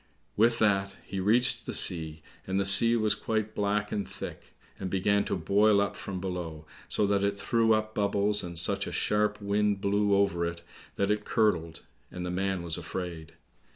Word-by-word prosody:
With 115 +2 +3
that 100 -3 +1
he 95 - -5
reached 115 +6 +2
the - - -3
sea, 80 -3 +2 0.2
and 95 +1 0
the 100 - 0
sea 115 +4 +7
was 110 -2 +2
quite 110 -1 -3
black 105 0 -1
and 100 - -3
thick, - - -9 0.2
and 95 - -4
began 100 +2 +1
to - - -2
boil 100 +4 +3
up 100 0 -1
from 95 -2 -6
below, 85 -4 -5 0.2
so 105 - +1
that 100 0 +1
it 100 0 0
threw 115 +3 +2
up 110 0 -3
bubbles, 105 0 +1
and 85 -1 -6
such 85 - 0
a - - -5
sharp 105 0 0
wind 100 0 0
blew 100 +1 +1
over 100 -3 +1
it 85 0 -4 0.3
that 100 +1 0
it 105 0 -1
curdled, 85 -9 0 0.3
and 90 0 -6
the 90 - -3
man 95 -1 -2
was 85 0 -3
afraid. 85 -1 -6
100 Hz, 190 wpm, -28 LUFS, 90-105 Hz, 0.3 s, sea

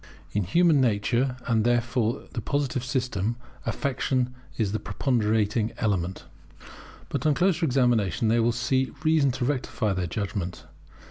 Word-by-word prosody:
[In 105 -2 0
human 165 - +4
nature, 120 +3 +1
and 115 -3 +2
therefore 120 -1 +1
in - - -18
the 115 - -3
Positive 135 -1 -1
system, 125 -5 -1 0.3
Affection 130 -2 0 0.2
is 105 -4 0
the 110 - -1
preponderating 110 -3 0
element] 95 -4 -1 0.9
But - - -2
on 150 - +3
closer 175 -1 +2
examination 120 -4 +2
they 115 +2 +3
will 115 +1 +3
see 130 +1 0
reason 155 -3 +4
to 130 -1 -2
rectify 125 -6 -1
their 90 -2 -2
judgment. 90 -5 -4
120 Hz, 140 wpm, -26 LUFS, 105-130 Hz, 0.9 s, human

